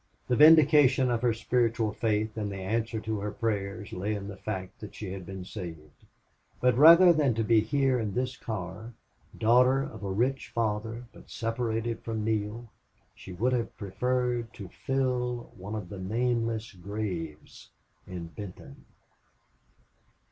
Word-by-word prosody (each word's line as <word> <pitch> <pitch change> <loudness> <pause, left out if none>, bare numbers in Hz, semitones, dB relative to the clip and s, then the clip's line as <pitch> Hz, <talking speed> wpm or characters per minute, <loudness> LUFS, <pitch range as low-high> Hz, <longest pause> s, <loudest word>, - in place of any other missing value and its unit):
The 125 - +3
vindication 150 -4 +6
of 115 -1 0
her 120 -1 +3
spiritual 115 -1 0
faith 110 -1 -1
and 105 -2 -3
the - - -5
answer 110 +4 -2
to 110 -1 -3
her 105 +1 -3
prayers 105 -2 -3
lay 100 +4 -2
in 100 -1 -6
the 100 - -7
fact 95 -2 -6
that 105 - -9
she 105 -4 -6
had 95 -3 -8
been 95 -1 -7
saved; 80 -7 -9 0.5
but 125 -1 +3
rather 170 +6 +9
than 145 -7 +2
to 115 - 0
be 115 0 +4
here 135 +2 +1
in 105 -4 -3
this 130 +1 -1
car, 110 +1 -6 0.4
daughter 125 +4 +4
of 110 -6 -8
a 100 - -3
rich 120 +3 0
father, 115 0 -2
but - - -16
separated 115 0 -2
from 110 -2 -3
Neale, 110 +2 -2 0.5
she 95 - -11
would 115 +8 0
have 120 -2 -2
preferred 120 +3 -1
to 95 -3 -8
fill 125 0 -2
one 100 +3 -7
of 105 -5 -6
the 100 - -7
nameless 115 +2 -1
graves 90 -5 -6 0.4
in 90 -2 -6
Benton. 90 +4 -10
110 Hz, 155 wpm, -28 LUFS, 100-125 Hz, 0.5 s, rather